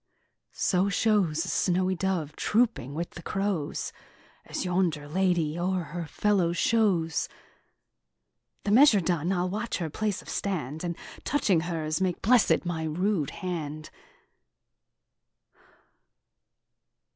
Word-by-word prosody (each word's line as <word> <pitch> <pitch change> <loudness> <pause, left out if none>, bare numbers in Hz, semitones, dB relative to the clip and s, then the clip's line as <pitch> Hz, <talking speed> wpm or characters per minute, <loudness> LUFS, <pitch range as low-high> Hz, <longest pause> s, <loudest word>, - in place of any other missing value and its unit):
So 190 +1 +2
shows 195 -6 +2
a - - -7
snowy 185 0 +1
dove 170 -5 -2
trooping 210 - +1
with 170 +1 -5
crows 195 -7 -2 0.5
As - - -4
yonder 175 -5 0
lady 175 -1 +1
o'er 185 0 0
her 170 -2 -4
fellows 180 -1 +1
shows. 190 -8 +2 1.3
The 205 - -1
measure 240 -2 +7
done, 170 -1 0
I'll 180 -1 +1
watch 215 +4 -2
her 165 -4 -3
place 210 +2 -2
of - - -19
stand, 160 -6 -3
And 170 -1 -3 0.3
touching 205 - +2
hers, 160 -1 -2
make 185 -2 -1
blessed 235 -3 +4
my 165 -2 -2
rude 160 0 0
hand. 155 -5 -5
180 Hz, 110 wpm, -28 LUFS, 160-195 Hz, 1.3 s, measure